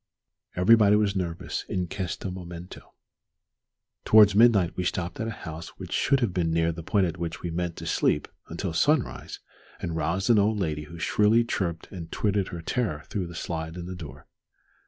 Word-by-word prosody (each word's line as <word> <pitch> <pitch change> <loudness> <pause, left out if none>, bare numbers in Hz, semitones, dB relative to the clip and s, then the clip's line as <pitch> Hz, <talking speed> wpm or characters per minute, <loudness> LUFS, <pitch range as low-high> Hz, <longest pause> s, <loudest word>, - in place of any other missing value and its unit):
Everybody 105 +2 +6
was 105 -1 +2
nervous 85 -3 -3
"in 90 -1 -1
questo 95 +1 -4
momento." 90 -1 -9 1.1
Towards 105 -2 +7
midnight 105 -5 +5
we 90 - -2
stopped 85 -1 -2
at 115 - -2
a 115 - -7
house 80 0 -8
which - - -8
should 135 -1 +2
have 110 -7 0
been 85 -3 0
near 80 0 +2
the 85 +1 -7
point 95 +4 +2
at 90 0 -4
which 85 -1 -4
we 85 - -3
meant 85 0 -2
to - - -8
sleep 75 - +1 0.2
until 85 +1 -4
sunrise, 145 - 0 0.4
and 85 - -4
roused 85 +8 +1
an 110 - +6
old 105 +2 +2
lady 75 -5 -2
who 85 +3 -11
shrilly 105 +6 +3
chirped 85 -7 -3
and 85 -3 -8
twittered 100 -2 0
her 85 -2 -7
terror 100 - -1
through 95 -4 -2
the 85 - -10
slide 80 0 -4
in 85 - -6
the 90 - -6
door. 80 -5 -10
90 Hz, 185 wpm, -26 LUFS, 85-105 Hz, 1.1 s, Towards